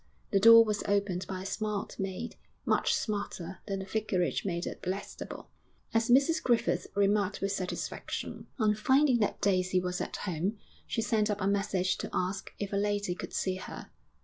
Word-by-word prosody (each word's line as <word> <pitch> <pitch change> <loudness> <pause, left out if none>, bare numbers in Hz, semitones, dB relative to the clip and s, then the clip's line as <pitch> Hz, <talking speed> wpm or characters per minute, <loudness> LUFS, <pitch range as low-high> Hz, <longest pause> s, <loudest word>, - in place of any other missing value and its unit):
The 195 - +4
door 230 +2 +9
was 210 -1 -1
opened 200 -2 0
by 185 -1 -4
a - - -9
smart 210 0 -3
maid 195 +5 -4 0.3
much - - +2
smarter 195 -4 -3
than 195 -1 -1
the 190 - -5
Vicarage 195 -3 0
maid 175 -3 -2
at - - -6
Blackstable, 190 +2 -5 0.4
as 225 +1 +2
Mrs 280 +6 +4
Griffith 240 -2 +1
remarked 200 0 +2
with 195 0 -1
satisfaction. 185 -2 -4
On 215 -4 +3
finding 260 +4 +3
that 210 - 0
Daisy 185 -2 +2
was 180 0 -2
at - - -4
home, 185 +3 -2 0.3
she 225 - -1
sent 215 -1 +1
up 210 0 -1
a 190 - -1
message 195 -2 +1
to - - -4
ask 185 +2 -2
if 200 -1 -4
a - - +2
lady 205 -2 0
could - - -7
see 185 -1 -1
her. - - -8
200 Hz, 175 wpm, -30 LUFS, 185-215 Hz, 0.4 s, door